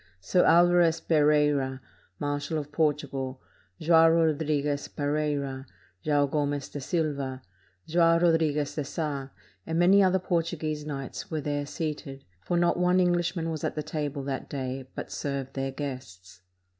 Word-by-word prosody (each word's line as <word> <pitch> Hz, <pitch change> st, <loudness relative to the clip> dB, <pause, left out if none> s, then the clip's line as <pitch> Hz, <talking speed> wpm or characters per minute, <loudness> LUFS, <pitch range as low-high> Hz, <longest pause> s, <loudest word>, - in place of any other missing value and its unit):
Sir 180 Hz, -, +2 dB
Alvarez 170 Hz, -1 st, +5 dB
Pereira, 150 Hz, -4 st, +2 dB, 0.4 s
marshal 145 Hz, +2 st, -2 dB
of 145 Hz, -1 st, -5 dB
Portugal, 140 Hz, -4 st, -1 dB, 0.4 s
Joao 165 Hz, 0 st, +6 dB
Rodriguez 150 Hz, -3 st, +1 dB
Pereira, 145 Hz, -2 st, -2 dB, 0.4 s
Joao 145 Hz, -1 st, +3 dB
Gomez 145 Hz, -1 st, -1 dB
de 145 Hz, -, -6 dB
Silva, 140 Hz, -4 st, -2 dB, 0.4 s
Joao 165 Hz, 0 st, +4 dB
Rodriguez 160 Hz, -4 st, +2 dB
de 150 Hz, -, -2 dB
Sa, 140 Hz, -2 st, -4 dB, 0.4 s
and 160 Hz, 0 st, -1 dB
many 185 Hz, +4 st, +6 dB
other 190 Hz, -1 st, +4 dB
Portuguese 165 Hz, -4 st, -2 dB
knights, 135 Hz, -2 st, -6 dB
were 160 Hz, -, -2 dB
there 145 Hz, 0 st, -2 dB
seated; 150 Hz, -3 st, -5 dB, 0.2 s
for 175 Hz, -, 0 dB
not 175 Hz, 0 st, +2 dB
one 180 Hz, +1 st, +3 dB
Englishman 175 Hz, -2 st, +1 dB
was 155 Hz, -2 st, -5 dB
at -, -, -2 dB
the 150 Hz, -, -2 dB
table 145 Hz, -2 st, -3 dB
that 135 Hz, -1 st, -4 dB
day, 130 Hz, -1 st, -4 dB
but -, -, -6 dB
served 140 Hz, -2 st, -4 dB
their 135 Hz, 0 st, -2 dB
guests. 130 Hz, -11 st, -8 dB
150 Hz, 140 wpm, -27 LUFS, 140-165 Hz, 0.4 s, Joao